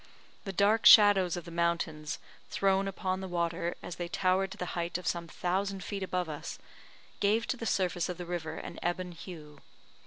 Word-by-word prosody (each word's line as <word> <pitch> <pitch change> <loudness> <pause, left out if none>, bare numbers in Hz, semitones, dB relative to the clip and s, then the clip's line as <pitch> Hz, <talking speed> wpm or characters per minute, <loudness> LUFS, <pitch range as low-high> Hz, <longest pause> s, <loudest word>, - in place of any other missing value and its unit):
The 195 - -3
dark 210 +3 +4
shadows 195 -5 +8
of 175 - -6
the 170 - -9
mountains, 165 -3 -1 0.3
thrown 195 0 +2
upon 190 -1 -2
the 190 - -4
water, 170 0 -1
as 175 - -6
they 175 - -3
towered 185 +2 +1
to - - -9
the 180 - -3
height 170 0 -2
of 180 - -10
some 170 -1 -1
thousand 190 +3 -2
feet 200 -1 -4
above 180 -2 -1
us, 150 -2 -6 0.6
gave 215 +3 +2
to 260 - 0
the 230 - -4
surface 180 -3 0
of 180 - -4
the 175 - -6
river 165 -2 -4
an - - -7
ebon 180 +1 -2
hue. 155 -4 -10
180 Hz, 190 wpm, -31 LUFS, 170-195 Hz, 0.6 s, shadows